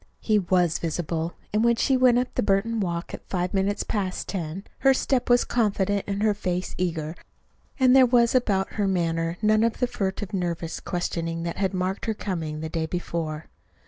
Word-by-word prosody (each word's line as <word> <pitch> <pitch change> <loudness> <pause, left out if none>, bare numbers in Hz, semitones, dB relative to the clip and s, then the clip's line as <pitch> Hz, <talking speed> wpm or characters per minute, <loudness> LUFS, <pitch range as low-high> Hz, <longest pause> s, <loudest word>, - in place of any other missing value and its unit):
He 215 -2 +2
was 180 -3 +2
visible 165 0 -2 0.2
and 215 +1 +2
when 235 0 +4
she 265 +3 +2
went 255 -2 +5
up 250 +1 -1
the - - 0
Burton 210 +3 +1
walk 170 -3 -3
at - - -9
five 180 -1 -1
minutes 200 +1 0
past 190 -4 -2
ten, 180 0 -4 0.2
her 270 0 +5
step 260 -1 0
was 245 0 +5
confident 205 -3 0
and 200 +1 -1
her 215 -1 +4
face 185 -3 -3
eager; 160 -3 -2 0.7
and 260 -1 +6
there 260 -1 +7
was 235 -1 +4
about 205 -7 +1
her 205 -2 0
manner 165 -2 0
none 215 +1 +4
of 230 0 +1
the 250 - +2
furtive, 205 -3 -3
nervous 170 -3 -2
questioning 165 -2 -3
that 170 0 -4
had 190 -1 0
marked 185 +4 -2
her 220 - 0
coming 160 -7 -4
the 160 - -3
day 160 0 -2
before. 160 -3 -3
190 Hz, 190 wpm, -25 LUFS, 170-215 Hz, 0.7 s, there